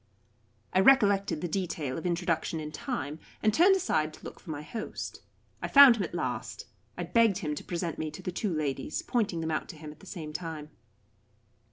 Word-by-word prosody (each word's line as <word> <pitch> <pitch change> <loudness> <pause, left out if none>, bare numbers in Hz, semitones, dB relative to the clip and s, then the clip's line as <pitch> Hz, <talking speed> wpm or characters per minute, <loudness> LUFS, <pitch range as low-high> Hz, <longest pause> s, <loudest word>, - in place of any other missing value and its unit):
I 185 - +4
recollected 200 - +4
the 175 - -1
detail 165 -7 -2
of 165 - -3
introduction 170 -2 -1
in 150 -1 -5
time, 155 - -4 0.2
and 215 -1 +4
turned 375 - +6
aside 155 - 0
to - - -19
look - - -9
for - - -14
my 150 -1 -4
host. 215 +8 -6 0.4
I - - -2
found 275 -4 +9
him - - -2
at 175 - -5
last. 120 -7 -3 0.3
I 175 - -2
begged 200 +3 +3
him 155 -6 -2
to 150 - -6
present 170 -2 -3
me 155 - -2
to 185 - -10
the 180 - -3
two 195 +2 -2
ladies, 150 -3 -2
pointing 210 -8 0
them 160 0 -2
out 155 - -2
to - - -8
him 150 -1 -8
at 150 - -16
the 195 - -15
same 160 -5 -7
time. 160 -2 -6
170 Hz, 205 wpm, -29 LUFS, 155-200 Hz, 0.4 s, found